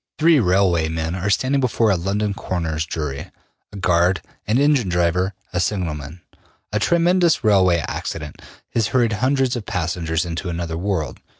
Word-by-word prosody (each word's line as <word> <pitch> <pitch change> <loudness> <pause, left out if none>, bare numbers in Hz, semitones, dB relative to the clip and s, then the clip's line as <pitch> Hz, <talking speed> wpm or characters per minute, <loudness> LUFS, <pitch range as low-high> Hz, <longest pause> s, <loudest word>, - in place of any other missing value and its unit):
Three 160 -1 +5
railway 90 -5 +2
men 80 +1 -2
are 95 +2 -2
standing 130 +6 +1
before 115 -3 +2
a - - +3
London 100 +4 -1
coroner's 80 -4 -3
jury 75 -4 -4 0.4
a 105 - -9
guard, 90 0 +2 0.3
an 110 +4 +2
engine 140 -7 +3
driver, 90 +2 +1 0.2
a 90 - 0
signalman. 85 -5 -3 0.5
A 105 - +1
tremendous 170 - +3
railway 95 -6 +4
accident 75 -3 -5 0.3
has 115 -2 +1
hurried 120 -2 +1
hundreds 130 +3 +1
of 115 -4 -6
passengers 85 -3 -1
into 85 +2 -4
another 85 -1 -3
world. 85 -6 -2
95 Hz, 155 wpm, -21 LUFS, 85-110 Hz, 0.5 s, Three